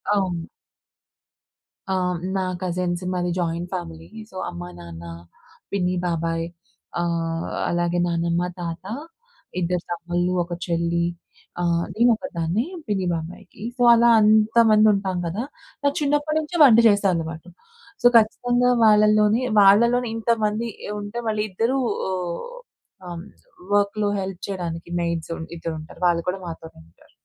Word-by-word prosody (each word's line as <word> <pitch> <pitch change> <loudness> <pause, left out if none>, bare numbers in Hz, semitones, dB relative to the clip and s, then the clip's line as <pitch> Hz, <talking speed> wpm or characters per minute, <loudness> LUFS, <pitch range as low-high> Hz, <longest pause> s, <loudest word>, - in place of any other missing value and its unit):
అవును. 180 -4 -1 1.4
ఆ! - - +1 0.4
నా 190 - 0 0.2
కజిన్స్ 180 0 -2
మాది 175 -1 -1
జాయింట్ 170 +1 -2
ఫ్యామిలీ 80 0 -6 0.2
సో - - -16
అమ్మ, 85 - -8 0.2
నాన్న, 85 -1 -10 0.7
పిన్ని, 180 -2 0
బాబాయ్ 165 0 -1 0.6
ఆహ్, 165 -1 -1 0.2
అలాగే 175 0 0
నానమ్మ, 170 0 0 0.2
తాత 170 +1 -5 0.8
ఇద్దరు 175 0 -1
తమ్ముల్లు, 175 +1 -1
ఒక 175 0 -7
చెల్లి 170 0 0 0.6
ఆహ్, 170 -1 +1
నేను 235 +3 +4
ఒకదాన్నే. 190 - -2 0.2
పిన్ని, 190 -3 -1
బాబాయికి. 180 +5 -8
సో - - -4
అలా 235 +1 +5
అంతమంది 215 0 +5
ఉంటాం 190 -2 -1
గదా! 205 +9 -3 0.4
నాకు 285 0 +2
చిన్నప్పటి 295 +2 +1
నుంచే 315 +3 -4
వంట 235 -5 +8
చేసే 205 -1 +3
అలవాటు. 165 +1 -5 0.5
సో 245 - +7
ఖచ్చితంగా 245 +3 +2
వాళ్ళలోనే 215 +1 +5 0.2
వాళ్ళలోనే 235 +5 +5
ఇంతమంది 225 0 0 0.3
ఉంటే 205 +3 -7
వాళ్ళ 215 -1 -1
ఇద్దరూ 230 +8 0 0.3
ఆహ్, 180 -2 -3 0.7
ఆహ్, 170 0 -6 0.5
వర్క్‌లో 205 +1 +2
హెల్ప్ 190 -2 -5
చేయడానికి 170 -3 -5
మెయిడ్స్ 170 -1 -2 0.3
ఇద్దరు 165 0 -4
ఉంటారు 155 +3 -12
వాళ్ళు 170 -1 +1
కూడా 190 +1 -3
మాతోనే 165 - -9
ఉంటారు. - - -25
180 Hz, 125 wpm, -23 LUFS, 170-215 Hz, 1.4 s, వంట